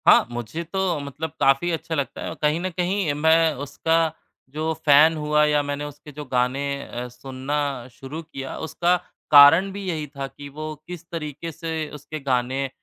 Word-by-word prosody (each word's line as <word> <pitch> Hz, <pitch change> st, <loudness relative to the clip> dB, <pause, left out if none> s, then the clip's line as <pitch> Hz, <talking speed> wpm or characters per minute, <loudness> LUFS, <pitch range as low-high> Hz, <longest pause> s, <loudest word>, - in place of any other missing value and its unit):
हाँ, -, -, +8 dB
मुझे 120 Hz, +8 st, -4 dB
तो 180 Hz, -1 st, -1 dB
मतलब 145 Hz, +3 st, -5 dB
काफ़ी 135 Hz, +5 st, +3 dB
अच्छा 165 Hz, 0 st, -3 dB
लगता 140 Hz, -3 st, -3 dB
है। -, -, -4 dB
कहीं 150 Hz, +2 st, +2 dB
न 185 Hz, -, -1 dB
कहीं 180 Hz, -2 st, 0 dB
मैं 160 Hz, +2 st, +4 dB
उसका 160 Hz, +3 st, 0 dB, 0.6 s
जो 160 Hz, +1 st, -1 dB
फ़ैन 150 Hz, +2 st, +7 dB
हुआ 150 Hz, 0 st, +2 dB
या 150 Hz, -1 st, +3 dB
मैंने 145 Hz, +1 st, -3 dB
उसके 145 Hz, +1 st, -10 dB
जो 145 Hz, +1 st, -8 dB
गाने 125 Hz, +1 st, 0 dB, 0.3 s
अ, 125 Hz, +1 st, -5 dB
सुनना 135 Hz, +1 st, -3 dB
शुरू 135 Hz, +6 st, -8 dB
किया, 135 Hz, -5 st, -7 dB
उसका 175 Hz, +2 st, +1 dB, 0.4 s
कारण 155 Hz, +7 st, +8 dB
भी 200 Hz, +1 st, -6 dB
यही 155 Hz, -3 st, -2 dB
था 135 Hz, 0 st, -3 dB
कि 145 Hz, +1 st, -11 dB
वो 155 Hz, +2 st, -6 dB
किस 175 Hz, -1 st, -8 dB
तरीके 160 Hz, 0 st, -5 dB
से 160 Hz, -2 st, -4 dB
उसके 150 Hz, +2 st, -7 dB
गाने 130 Hz, 0 st, 0 dB
150 Hz, 175 wpm, -24 LUFS, 140-165 Hz, 0.6 s, हाँ